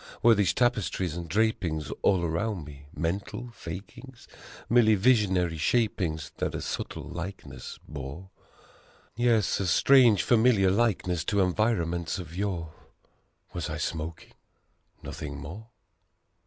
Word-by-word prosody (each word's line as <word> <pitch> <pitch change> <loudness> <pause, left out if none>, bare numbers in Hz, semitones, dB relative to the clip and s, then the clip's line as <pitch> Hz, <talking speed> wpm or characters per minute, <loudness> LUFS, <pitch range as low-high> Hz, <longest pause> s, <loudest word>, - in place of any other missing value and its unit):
Were 115 0 +8
these 100 -5 +2
tapestries 105 -8 0
and 85 -1 -6
drapings 90 -6 0
all 95 -3 +3
around 85 +1 -2
me 70 -1 -12
mental 100 +8 -3
fakings? 105 +8 -9 0.4
Merely 115 -2 +5
visionary 95 -7 +2
shapings 85 -7 0
that - - -2
a - - -3
subtle - - -4
likeness 85 -8 -7
bore 75 +6 -8 0.8
Yes, 115 -2 +2
a 95 - -1
strange 120 -1 +5
familiar 110 -5 +4
likeness 95 -6 +1
to 100 +1 +2
environments 90 -4 0
of 85 -3 -8
yore? 90 -5 -3 0.8
Was 85 -2 -3
I 80 - -3
smoking 80 +1 -5 0.7
nothing 70 -2 -6
more? 85 +11 -8
95 Hz, 115 wpm, -28 LUFS, 80-110 Hz, 0.8 s, Were